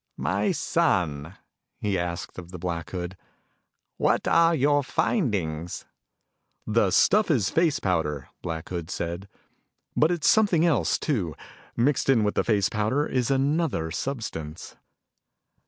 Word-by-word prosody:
"My - - 0
son," 75 +1 0 0.4
he 105 -2 -1
asked 85 0 -4
of 85 -1 -10
the 90 - -8
Black 85 -1 -4
Hood, 90 0 -5 0.8
"what - - +1
are 165 0 +4
your 145 0 +3
findings?" 95 - -1 0.8
"The 110 -2 +2
stuff 205 - +4
is 120 - +2
face 160 -2 +2
powder," 80 -7 -1
Black 80 -1 -5
Hood 85 -2 -5
said. 85 +2 -4 0.7
"But 155 - +4
it's 175 -3 0
something 200 -7 +4
else, 130 - +2
too. 95 - -2 0.4
Mixed 135 +3 +1
in 120 -5 +4
with 105 - +1
the - - +1
face 100 -4 +2
powder 110 +8 0
is 125 -5 -1
another 135 - 0
substance." 85 - -5
105 Hz, 130 wpm, -26 LUFS, 85-145 Hz, 0.8 s, are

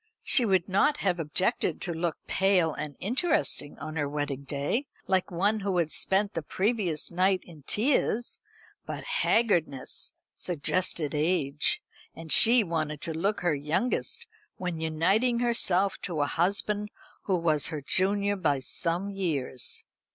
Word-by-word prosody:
She 250 - +4
would 190 -4 +2
not 285 +10 +3
have 180 -2 +2
objected 165 +4 0
to 175 - -2
look 165 -1 -2
pale 190 -5 +2
and 150 -2 -6
interesting 255 - 0
on 155 +2 -6
her 145 -2 0
wedding 145 -2 -3
day, 145 - -2 0.2
like 190 -1 +1
one 200 +5 +1
who 195 -2 -1
had 165 -3 +1
spent 200 +2 +1
the 165 - -2
previous 185 -1 0
night 185 +2 +2
in 160 -4 -14
tears; 240 0 +1 0.4
but - - -6
haggardness 170 - +1 0.2
suggested 170 -2 -1
age; 150 -2 +1 0.3
and 165 -1 -8
she 235 +1 +7
wanted 155 -4 -2
to 165 - -3
look 195 +6 -1
her 175 -3 +2
youngest 230 - -1 0.3
when 180 -3 -3
uniting 190 +10 +2
herself 200 -5 +1
to 165 -6 -2
a - - +3
husband 205 +6 0 0.4
who 190 -2 +2
was 155 -4 +2
her 155 -4 -5
junior 200 +5 +1
by 155 -7 +1
some 170 +8 -1
years. 150 -10 0
180 Hz, 145 wpm, -28 LUFS, 155-200 Hz, 0.4 s, she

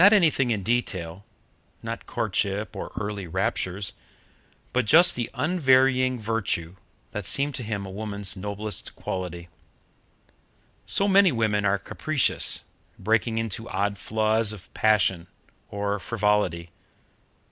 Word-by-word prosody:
Not 205 +3 +8
anything 155 - +4
in 105 -4 -1
detail 95 -6 -2 0.6
not 115 0 -6
courtship 105 -2 -1
or - - -6
early 100 -3 -4
raptures 90 +3 -2 0.8
but 125 -2 +2
just 175 +6 +7
the 120 -1 -2
unvarying 130 -6 +3
virtue, 105 -6 -2 0.4
that 105 - -4
seemed 140 +9 0
to 125 - -4
him 105 -3 -3
a 95 - -7
woman's 100 -1 -2
noblest 100 +1 -4
quality. 90 -2 -5 1.4
So 200 - +3
many 195 -1 +6
women 110 -4 +1
are 100 0 +3
capricious, 155 +7 0 0.3
breaking 110 +3 +1
into 115 0 -3
odd 100 +1 -1
flaws 110 +1 +1
of 105 -4 -10
passion 95 -5 +2 0.4
or 100 0 -2
frivolity. 105 -6 0
105 Hz, 120 wpm, -25 LUFS, 100-120 Hz, 1.4 s, Not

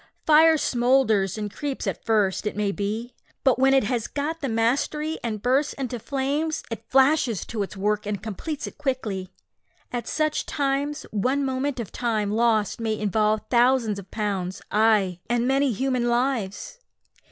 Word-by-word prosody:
Fire 315 +1 +6
smoulders 240 - +2
and 210 -2 -4
creeps 285 -3 -4
at - - -3
first, 210 -2 +1
it 210 - -4
may 205 -1 +1
be, 215 +5 -3 0.3
but 260 -3 +3
when 265 +1 +5
it 270 - +4
has 230 +1 -1
got 310 +3 -3
the 275 - -2
mastery, 280 +7 0
and 215 -3 -3
bursts 265 +4 +2
into 255 -3 -4
flames, 285 +6 -1
it 225 0 -7
flashes 265 - +3
to 225 -3 -4
its 200 +1 -5
work 210 +1 0
and 205 -3 -3
completes 250 - -4
it - - -10
quickly. 220 -10 -3 0.6
At 240 -1 -4
such 310 -1 0
times, 285 +1 -1
one 255 +7 0
moment 265 0 -2
of 230 - -5
time 215 -4 -1
lost 225 -1 +1
may 220 -1 -1
involve 215 +1 +1
thousands 240 -4 +3
of 195 -1 -12
pounds 195 -4 -3
ay, 210 -4 +3
and 240 0 +1
many 270 0 +2
human 250 +1 0
lives! 240 - -1
240 Hz, 165 wpm, -24 LUFS, 210-270 Hz, 0.6 s, Fire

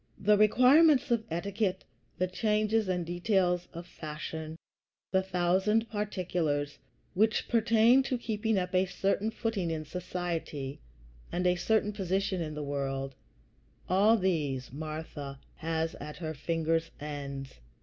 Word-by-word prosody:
The 210 +1 +4
requirements 255 +7 +5
of 230 -2 +2
etiquette, 190 +3 -1 0.3
the 185 - +2
changes 215 +2 +1
and 180 -2 0
details 180 0 +1
of 170 +1 -8
fashion, 155 -1 -6 0.6
the 190 - +3
thousand 190 +4 +1
particulars 175 -8 -1 0.3
which 215 +3 +2
pertain 230 +2 +5
to 255 - 0
keeping 220 -2 -1
up 180 0 -2
a 185 +1 +3
certain 195 +3 0
footing 225 -5 -2
in 155 -1 -3
society 165 -5 -4 0.5
and 180 +1 -1
a 180 - +5
certain 210 +3 +1
position 190 -1 -1
in 155 -2 -4
the 150 - -4
world 135 -1 -3 0.7
all 205 +5 +5
these 145 - -1
Martha 155 -2 -6 0.2
has 160 0 -1
at 150 +1 -7
her 160 -3 -4
fingers' 165 +2 0
ends. 140 - -6
180 Hz, 130 wpm, -30 LUFS, 155-210 Hz, 0.7 s, requirements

